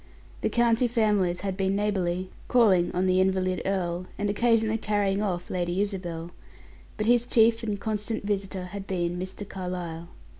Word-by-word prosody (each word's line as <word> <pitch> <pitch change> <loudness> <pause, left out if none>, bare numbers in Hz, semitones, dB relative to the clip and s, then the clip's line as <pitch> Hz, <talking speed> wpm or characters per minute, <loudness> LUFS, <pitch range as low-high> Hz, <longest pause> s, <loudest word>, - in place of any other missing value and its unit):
The - - +1
county 235 +1 +3
families 210 -7 +1
had 195 -1 -2
been 195 0 0
neighborly, 185 -3 -1 0.2
calling 195 -8 +4
on 180 +1 0
the 185 0 +3
invalid 185 -1 +1
earl, 180 -2 -1
and 205 0 0
occasionally 225 0 +2
carrying 205 -2 0
off 180 -4 -2
Lady 175 0 -1
Isabel, 175 -5 -3 0.7
but 215 - -1
his 240 +1 +3
chief 230 -1 +4
and 210 -3 -3
constant 215 +1 -3
visitor 195 -2 -2
had 200 -1 -6
been 175 -1 -1
Mr. 185 +2 -6
Carlyle. 175 -3 -5
195 Hz, 155 wpm, -27 LUFS, 180-215 Hz, 0.7 s, calling